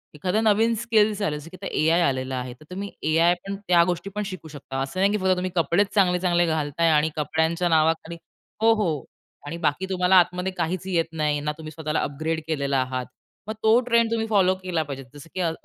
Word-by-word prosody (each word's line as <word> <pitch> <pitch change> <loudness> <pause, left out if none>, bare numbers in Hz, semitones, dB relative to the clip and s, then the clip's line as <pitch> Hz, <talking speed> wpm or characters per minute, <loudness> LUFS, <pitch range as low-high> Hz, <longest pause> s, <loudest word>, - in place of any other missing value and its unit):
एखादा 180 +8 0
नवीन 225 +1 +3
स्किल्स 215 -2 +2
आले 150 -7 -1
की 185 - -11 0.3
एआय 165 +2 +4
आलेला 130 -4 0
आहे. 125 -1 -4
तर 130 +5 -18
तुम्ही 200 +2 -5 0.2
एआय 170 +2 +5
पण 200 - -3
त्या 175 -1 +5
गोष्टी 180 +2 -2
पण 210 - -1
शिकू 185 -5 -7
शकता, 140 -3 -6
असं 135 +7 -4
नाही 200 +1 +3
की 210 - +1
फक्त 190 -2 +2
तुम्ही 185 0 -3
कपडे 170 +3 +3
चांगले-चांगले 180 -3 +2
घालताय 160 0 0
आणि 155 0 +3
कपड्यांच्या 160 +3 0
नावाखाली 160 +1 +1 0.4
हो, 225 0 +6
हो. 170 - -1 0.4
आणि 155 +3 -5
बाकी 170 +2 0
तुम्हाला 185 0 +2
आतमध्ये 180 +1 +3
काहीच 180 +2 -2
येत 170 -3 +1
नाही, 150 -2 0
ना 150 +1 -2
तुम्ही 155 -1 -8
स्वतःला 155 0 -2
अपग्रेड 155 +3 -2
केलेला 140 -3 0
आहात. 130 0 -3 0.4
मग 215 - -3
तो 220 +2 +5
ट्रेंड 235 -1 +3
तुम्ही 225 -1 0
फॉलो 195 -4 +3
केला 175 -3 -1
पाहिजे. 140 -2 -7
जसं 145 +2 -12
की - - -3
अ, 170 -2 +1
170 Hz, 205 wpm, -24 LUFS, 155-190 Hz, 0.4 s, हो